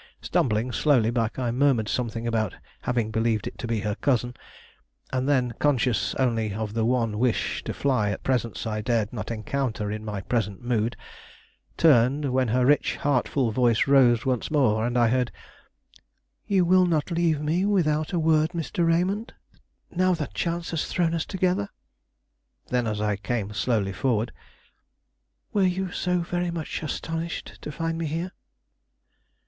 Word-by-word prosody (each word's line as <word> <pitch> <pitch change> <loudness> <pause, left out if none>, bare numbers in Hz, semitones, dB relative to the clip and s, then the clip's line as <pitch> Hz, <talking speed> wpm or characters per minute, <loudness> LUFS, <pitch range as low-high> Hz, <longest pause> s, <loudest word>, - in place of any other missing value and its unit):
Stumbling 115 +1 0
slowly 125 -6 +3
back, 115 -2 -1
I 125 -2 -1
murmured 125 -3 +2
something 115 -1 -2
about 110 -4 -1 0.3
having 120 -3 -1
believed 110 -2 0
it - - -7
to 120 - -4
be 115 -3 -1
her 105 0 -1
cousin; 125 +1 0 0.8
and 130 +2 0
then, 125 -4 +2
conscious 125 -8 +1
only 115 -6 0
of 110 -1 -3
the 115 0 0
one 115 -3 0
wish 125 -1 0
to - - -2
fly 125 -7 +1
a 100 - -2
presence 120 -4 -2
I 110 -1 -2
dared 110 -1 0
not 105 -3 -5
encounter 110 -1 -2
in 110 0 -5
my 105 -2 -4
present 105 -1 -2
mood, 120 -1 0 0.8
turned, 140 -1 +4
when 130 -1 +2
her 125 +3 +2
rich, 145 +3 +3
heart 140 -4 +1
full 130 -5 0
voice 120 -1 +3
rose 130 -4 +4
once 130 -3 0
more 120 -7 +2
and 120 0 -1
I 120 -1 +4
heard: 125 0 +1 1.2
"You 190 -3 +3
will 185 +1 +5
not 160 0 0
leave 165 -3 +1
me 155 +5 0
without 155 -6 +1
a 180 - 0
word, 160 0 +2
Mr. 170 0 -1
Raymond, 185 +7 0 0.6
now 185 0 +2
that 155 -3 -5
chance 170 0 -2
has 165 -2 -1
thrown 170 -2 0
us 165 -1 -1
together?" 180 - 0 1.0
Then, 125 -2 +1
as 105 -1 -2
I 105 -1 0
came 105 0 -3
slowly 105 -3 0
forward: 115 +2 0 1.2
"Were 205 - +2
you 185 0 +1
so 180 0 0
very 175 +1 -2
much 165 -2 -4
astonished 165 +2 -4
to - - -6
find 165 +2 -3
me 165 - -1
here?" 165 +4 -3
125 Hz, 165 wpm, -25 LUFS, 110-160 Hz, 1.2 s, will